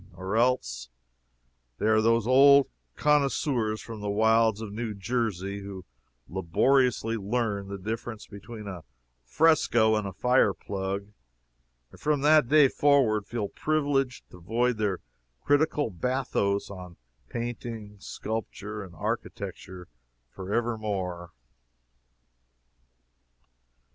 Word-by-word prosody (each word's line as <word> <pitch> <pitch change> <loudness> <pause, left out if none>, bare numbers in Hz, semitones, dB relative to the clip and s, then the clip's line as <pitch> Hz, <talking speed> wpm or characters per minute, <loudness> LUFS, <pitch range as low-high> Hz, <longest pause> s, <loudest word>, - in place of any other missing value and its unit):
Or 95 +3 -4
else 60 - 0 0.9
they - - -3
are 110 0 +4
those 115 0 +2
old 140 +2 +6 0.3
connoisseurs 135 -6 +1
from 115 -2 -8
the 105 - -3
wilds 110 +1 +3
of 110 -2 -6
New 110 -1 -4
Jersey 100 -3 -2
who 100 -2 -8 0.4
laboriously 115 - +1
learn 105 -1 -2
the 100 0 -5
difference 110 +3 -5
between 110 +1 -10
a 90 -4 -7 0.4
fresco 120 - +3
and 105 -2 0
a - - -5
fire 125 +6 +2
plug 100 0 -4 0.8
and - - -16
from 150 -2 +1
that 150 -2 +5
day 150 +1 +6
forward 130 -8 +2
feel 110 -4 -3
privileged 145 -4 -1
to 90 - -13
void 115 +6 0
their 105 -4 -1 0.4
critical 145 -3 +2
bathos 100 -1 -1
on 90 -3 -10 0.3
painting, 115 -3 -6
sculpture 105 0 -5
and 90 -3 -12
architecture 90 +2 -5 0.4
forever 110 +4 -2
more. 90 -5 -4
110 Hz, 110 wpm, -27 LUFS, 100-125 Hz, 0.9 s, old